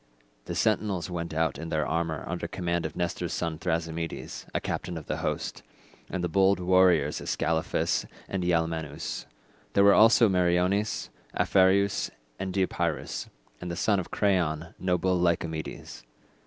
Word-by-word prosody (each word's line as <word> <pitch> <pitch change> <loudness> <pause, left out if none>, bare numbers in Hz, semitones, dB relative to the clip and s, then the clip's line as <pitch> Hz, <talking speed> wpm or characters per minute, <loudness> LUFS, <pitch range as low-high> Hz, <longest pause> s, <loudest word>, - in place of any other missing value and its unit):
The - - -4
sentinels 100 -5 0
went 85 -1 -3
out 80 +1 0
in 80 0 -5
their 80 -2 0
armour 80 -2 -1
under 85 -1 -3
command 85 -1 -1
of - - -12
Nestor's 85 -1 -2
son 80 -2 -2
Thrasymedes, 80 -1 -3
a - - 0
captain 85 -1 -4
of 80 - -7
the - - -2
host, - - -3 0.5
and - - -6
of 95 - -1
the - - +1
bold 95 +2 +4
warriors 90 0 +3
Ascalaphus 80 -1 0 0.2
and 95 -2 -2
Ialmenus: 80 -3 -1 0.5
there 100 - +5
were 100 0 +7
also 115 +1 +7
Meriones, 90 +2 +1 0.3
Aphareus 95 +1 +3 0.3
and 95 - -3
Deipyrus, 90 -4 -1 0.3
and 90 - -5
the 85 - -3
son 100 +3 +2
of 90 - -5
Creion, 85 -5 0
noble 95 0 +1
Lycomedes. 85 -2 -2
90 Hz, 145 wpm, -28 LUFS, 80-95 Hz, 0.5 s, were